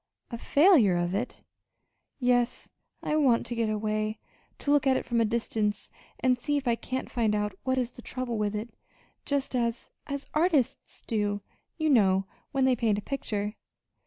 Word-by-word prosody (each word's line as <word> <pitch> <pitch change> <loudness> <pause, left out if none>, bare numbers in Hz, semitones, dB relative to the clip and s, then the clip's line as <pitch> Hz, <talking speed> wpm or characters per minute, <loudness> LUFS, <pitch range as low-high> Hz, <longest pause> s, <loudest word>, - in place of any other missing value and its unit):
"A 235 - -3
failure 280 - +5
of 175 +1 -1
it!" 225 +6 -3 0.8
"Yes. 245 -1 +1 0.3
I 300 - 0
want 265 -7 +3
to 240 - -3
get 230 -2 0
away 215 0 -1 0.4
to 285 - -1
look 290 -2 +4
at 260 -1 +4
it - - -4
from 235 -1 +1
a - - +4
distance, 215 -2 -1 0.3
and 255 -1 +2
see 290 +2 0
if 275 -2 -3
I 235 - +4
can't 255 +2 -4
find 225 -4 +1
out 210 -1 -1
what 260 0 +1
is 250 -1 0
the 245 - -12
trouble 240 -2 -4
with 210 0 0
it, 215 +3 -5 0.5
just 280 -2 -1
as 235 -1 -1 0.2
as 280 0 -4
artists 305 -5 0
do, 205 -2 -1 0.4
you 315 -1 0
know, 195 -6 +4 0.3
when 270 -2 +2
they 260 -1 +4
paint 220 -3 +1
a - - -3
picture." 210 -6 -3
235 Hz, 180 wpm, -28 LUFS, 215-260 Hz, 0.8 s, failure